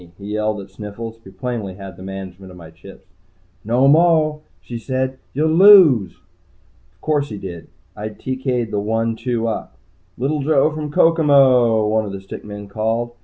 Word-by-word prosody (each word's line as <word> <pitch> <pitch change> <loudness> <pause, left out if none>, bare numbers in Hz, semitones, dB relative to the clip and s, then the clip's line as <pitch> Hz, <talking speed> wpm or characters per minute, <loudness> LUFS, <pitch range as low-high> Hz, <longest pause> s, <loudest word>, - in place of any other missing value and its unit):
he 100 - -11
yelled 105 0 -1
at 100 0 -11
Sniffles, 115 +3 -8
who 95 - -13
plainly 100 -1 -5
had 95 -2 -10
the 90 - -14
management 95 0 -8
of 90 - -13
my 80 -2 -12
chips. 95 +3 -15 0.6
"No 120 +5 +2
moah," 155 0 +3 0.2
she 120 -1 -8
said. 130 +2 -3
"You'll 155 +3 0
lose." 165 - +7 0.8
Of - - -37
course 145 -2 0
he 105 - -6
did. 90 -4 -8 0.3
I 105 +1 -5
TK'd 125 0 -3
the 105 - -1
one 115 +2 -1
two 115 0 -2
up. 110 - -5 0.4
"Little 140 +4 -1
Joe 150 +1 +2
from 150 -1 -5
Kokomo," 135 -9 +4
one 110 +1 +1
of 100 - -6
the 100 - -6
stick 95 - -10
men 105 -1 -9
called. 110 +3 -2
115 Hz, 170 wpm, -19 LUFS, 100-135 Hz, 0.8 s, lose